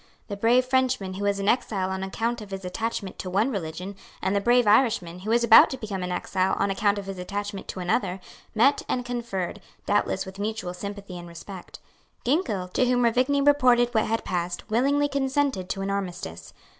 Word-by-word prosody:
The 200 - -3
brave 235 +5 +3
Frenchman 255 -7 +1
who 200 +2 -4
was 200 0 +1
an 200 - -2
exile 195 -5 +1
on 190 0 -3
account 225 +5 -2
of 210 - -9
his 195 -1 -6
attachment 200 +1 -4
to 185 - -4
one 210 +8 +1
religion, 180 0 -5 0.2
and 190 +2 0
the 200 - +2
brave 240 +2 +4
Irishman 205 -6 +3
who 200 +4 -6
was 235 +1 +3
about 230 -1 +8
to 265 - -4
become 205 -5 -5
an 180 0 -3
exile 185 +1 0
on 200 - +1
account 205 +1 +1
of 200 - -5
his 195 -1 -6
attachment 205 +2 -5
to - - -6
another, 180 +1 0 0.4
met 265 +6 +4
and 250 -1 -1
conferred, 230 -6 -4 0.2
doubtless 205 -1 +1
with 190 +1 -10
mutual 210 -3 -3
sympathy 200 -1 -7
and 175 - -9
respect. 175 +2 -10 0.5
Ginkell, 235 - 0
to 250 +7 +1
whom 245 0 +2
Ruvigny 255 +4 +2
reported 245 -4 +4
what 220 -2 +2
had 225 +1 -1
passed, 175 0 -3
willingly 280 +5 +2
consented 275 -8 -1
to 195 - -3
an 195 - -2
armistice. 180 - -5
205 Hz, 195 wpm, -25 LUFS, 190-240 Hz, 0.5 s, about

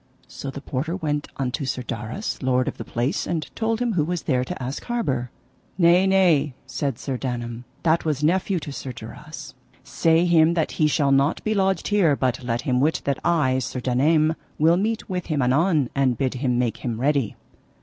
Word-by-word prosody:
So 140 - -7
the 140 +1 -7
porter 150 +6 -3
went 150 -5 -2
unto 135 +2 -2
Sir 130 -1 -2
Darras, 120 - -4
lord 130 -1 +1
of - - -3
the - - -3
place, 125 +9 -2
and 160 -3 -2
told 225 0 0
him 245 -2 0
who 165 -6 +2
was 175 +1 -2
there 125 -3 +1
to - - -6
ask 130 +3 -4
harbour. 140 - -1 0.5
Nay, 180 +1 +5
nay, 170 -8 +3
said 130 -1 -3
Sir 130 -3 -4
Daname, 120 -2 -4 0.2
that 165 0 +3
was 150 -2 -1
nephew 185 +3 +2
to 150 - -6
Sir 135 -2 -6
Darras, 115 -1 -9 0.3
say 165 +1 +2
him 170 -1 +4
that 160 -3 0
he 155 - +6
shall 145 -2 +2
not 140 +3 +2
be 215 - 0
lodged 190 -3 +1
here, 190 -8 +3
but 130 -1 -1
let 120 -1 -1
him 125 -1 0
wit 150 +4 +1
that 140 -1 0
I, 145 -7 +2
Sir 130 0 -4
Daname, 155 +6 +2 0.2
will 160 +3 +4
meet 220 +4 -1
with 180 -3 -3
him 155 -3 -1
anon, 145 +1 +2
and 130 -4 +1
bid 130 0 0
him 125 -1 0
make 120 -2 0
him 115 -3 -4
ready. 140 -4 +1
145 Hz, 200 wpm, -23 LUFS, 130-170 Hz, 0.5 s, he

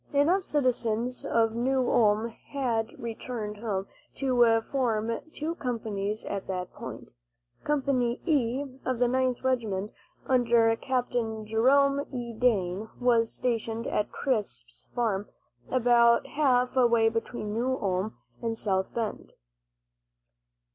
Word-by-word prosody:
Enough 330 +7 +3
citizens 250 -5 0
of 225 -1 +2
New 255 +2 +1
Ulm 215 0 +3
had 235 -2 -2
returned 225 -2 -5
home 205 -3 -2 0.3
to 240 -4 +3
form 230 -4 -1
two 310 +2 -3
companies 215 -7 -3
at 200 -1 -4
that 180 -1 -4
point. 115 -2 -9 0.5
Company 265 -5 +1
"E," 275 -5 +1 0.2
of 255 -1 -1
the 245 +1 +3
Ninth 255 0 0
Regiment, 215 -6 -1 0.3
under 235 -3 +4
Capt. 250 +1 -2 0.3
Jerome 275 +6 +3
E. 240 -3 -5
Dane, 215 -4 0
was 235 -2 +3
stationed 230 -2 -2
at 210 - -1
Crisp's 235 -7 -3
farm, 210 -5 0 0.4
about 235 -2 +4
half 255 -4 +2
way 235 -3 +4
between 225 -1 -3
New 255 +4 0
Ulm 195 +1 -1 0.2
and 230 -1 -2
South 190 -3 0
Bend. 225 -3 -4
235 Hz, 115 wpm, -28 LUFS, 220-255 Hz, 0.5 s, under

